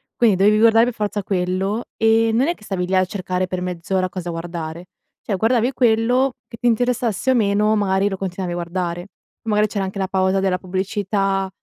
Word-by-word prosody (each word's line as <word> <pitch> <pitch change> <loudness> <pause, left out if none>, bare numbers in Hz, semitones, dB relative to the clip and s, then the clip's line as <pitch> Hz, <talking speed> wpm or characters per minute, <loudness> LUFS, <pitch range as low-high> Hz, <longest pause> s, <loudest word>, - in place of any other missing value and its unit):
quindi 225 -5 +4
dovevi 205 +3 +4
guardare 225 +1 +5
per 245 - -2
forza 210 -1 -2
quello. 190 +4 -1
E 225 0 +3
non 250 +5 +2
è 345 - 0
che - - -20
stavi 185 -3 -3
lì 190 - 0
a 185 0 +4
cercare 185 -1 -2
per 180 0 -4
mezz'ora 180 +1 -2
cosa 180 -1 -5
guardare. 165 0 -6 0.4
Cioè 205 - -2
guardavi 235 +4 +2
quello, 245 +2 +2
che 230 - -11
ti 240 - -7
interessasse 240 0 0
o - - +3
meno 210 -1 +2
magari 200 -1 +1
lo 195 - -4
continuavi 185 -1 -4
a - - -3
guardare. 175 +1 -3 0.4
Magari 210 -2 +2
c'era 200 -1 -3
anche 190 +1 -6
la 190 - 0
pausa 190 0 +1
della 190 -1 +1
pubblicità, 195 +1 -1
195 Hz, 195 wpm, -20 LUFS, 185-225 Hz, 0.4 s, guardare